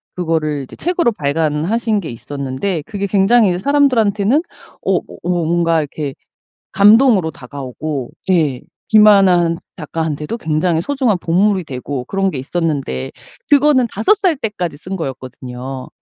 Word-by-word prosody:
그거를 160 -5 -1
이제 130 - -12
책으로 340 -8 0
발간하신 165 +8 0
게 165 - -6
있었는데 140 - -4
그게 200 -2 -4
굉장히 205 +4 +4
이제 175 - 0
사람들한테는 240 -2 +2 0.4
어어 - - +1 0.2
뭔가 170 -1 +1
이렇게 145 -2 -4 0.6
감동으로 205 -2 +5
다가오고 140 0 -6 0.2
예 155 -9 +2 0.3
김하나 205 -4 +6
한 170 -1 0 0.2
작가한테도 155 +3 -3
굉장히 160 -2 0
소중한 260 -4 0
보물이 185 +3 +1
되고 130 -1 -5
그런 195 +6 -1
게 155 - -6
있었는데 140 - -2 0.4
그거는 285 -3 +4
5 220 - +3
살 380 -6 +1
때까지 185 - -3
쓴 185 +6 -6
거였거든요. 130 -3 -7
175 Hz, 320 characters per minute, -17 LUFS, 145-210 Hz, 0.6 s, 김하나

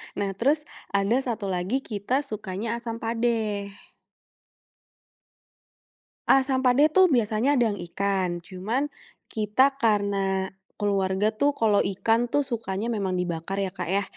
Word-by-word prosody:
Nah 200 -1 -1
terus 290 +7 +2 0.3
ada 200 +4 +2
satu 230 -6 -3
lagi 190 +8 -1
kita 225 +6 -1
sukanya 215 -1 -4
asam 230 -1 -6
padeh. 225 -3 -1 2.6
Asam 265 -1 +4
padeh 260 +4 +4
tuh 375 +3 +6
biasanya 240 - +2
ada 235 -4 +3
yang 205 - -5
ikan, 185 -1 -1
cuman 220 +11 -2 0.4
kita 260 +6 +2
karena 200 -4 +1 0.2
keluarga 200 0 +1
tuh 285 +6 +1
kalau 210 -3 +3
ikan 225 +5 +1
tuh 290 +4 +1
sukanya 230 -3 -3
memang 195 -4 -1
dibakar 180 +1 -3
ya 190 - -3
Kak 180 -2 -5
ya, 195 +3 +1
215 Hz, 125 wpm, -26 LUFS, 195-245 Hz, 2.6 s, tuh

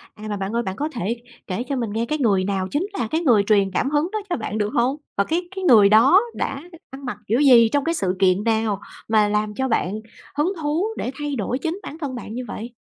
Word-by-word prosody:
À, 210 - -13
mà 205 - -2
bạn 195 +1 -3
ơi, 235 - +1
bạn 190 -3 -4
có 300 +7 -2
thể 235 - -3 0.3
kể 190 +5 -2
cho 275 +2 -3
mình 235 -4 -2
nghe 225 +2 -1
cái 305 +6 -2
người 205 -9 +2
nào 190 -1 -1
chính 320 +7 0
là 235 - 0
cái 320 - +1
người 235 -11 +4
truyền 200 -2 +2
cảm 265 - 0
hứng 300 +3 +1
đó 430 - -1
cho 350 - 0
bạn 215 -1 -4
được 210 -1 0
hông? 250 +4 +1 0.2
Và 200 - +4
cái 330 - -1
cái 380 - -4
người 225 - +7
đó 250 - +6
đã 275 +1 -3 0.3
ăn 270 +1 -10
mặc 245 -5 -4
kiểu 230 +5 +2
gì, 245 -6 +7
trong 285 +3 +1
cái 330 - 0
sự 190 - -1
kiện 190 +1 +3
nào 220 -3 0 0.3
mà 215 -1 +4
làm 210 0 0
cho 265 +3 -1
bạn 205 -5 0 0.4
hứng 305 +7 +1
thú 305 +5 0
để 250 - -3
thay 295 -1 -2
đổi 235 +2 -2
chính 325 +6 -3
bản 310 - -8
thân 280 -5 -4
bạn 230 -3 -7
như 250 +2 -4
vậy? 235 +3 -6
235 Hz, 260 wpm, -22 LUFS, 210-290 Hz, 0.4 s, người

